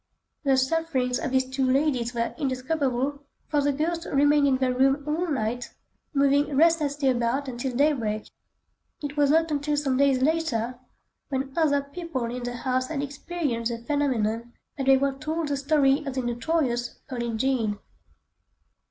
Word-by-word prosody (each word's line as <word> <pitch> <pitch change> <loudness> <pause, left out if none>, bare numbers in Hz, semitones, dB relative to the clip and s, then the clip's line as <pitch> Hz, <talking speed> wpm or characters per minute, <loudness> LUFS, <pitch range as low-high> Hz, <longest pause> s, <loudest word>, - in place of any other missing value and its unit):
The 270 -2 +3
sufferings 265 -3 0
of 310 - -2
these 260 0 +1
two 260 +1 -2
ladies 255 -2 +1
were 235 0 -1
indescribable, 270 0 -1 0.3
for 295 -1 +2
the 285 0 +2
ghost 330 +4 -2
remained 290 +1 +4
in 265 -2 +3
their 255 -1 +1
room 270 +3 +2
all 325 +4 0
night, 245 -4 -2 0.4
moving 280 0 +2
restlessly 300 -3 +3
about 255 +2 +1
until 250 0 -4
daybreak. 240 -7 +1 0.8
It 290 0 -4
was 290 -1 +3
not 325 +1 +3
until 295 0 0
some 275 -3 +1
days 270 -2 +3
later, 255 -6 0 0.5
when 270 -1 -2
other 285 -4 +2
people 280 -3 -4
in 250 - -5
the 245 0 -4
house 255 +1 -1
had 285 -2 -3
experienced 280 -5 -3
the 235 - -3
phenomenon, 235 -3 -1 0.2
that 270 -2 -3
they 270 0 +7
were 275 0 +1
told 305 +3 -3
the 285 - +1
story 280 0 +3
of 275 -3 -5
the 260 - -1
notorious 240 0 -1
"Pearlin' 235 -3 -3
Jean." 230 -4 0
270 Hz, 160 wpm, -26 LUFS, 250-295 Hz, 0.8 s, they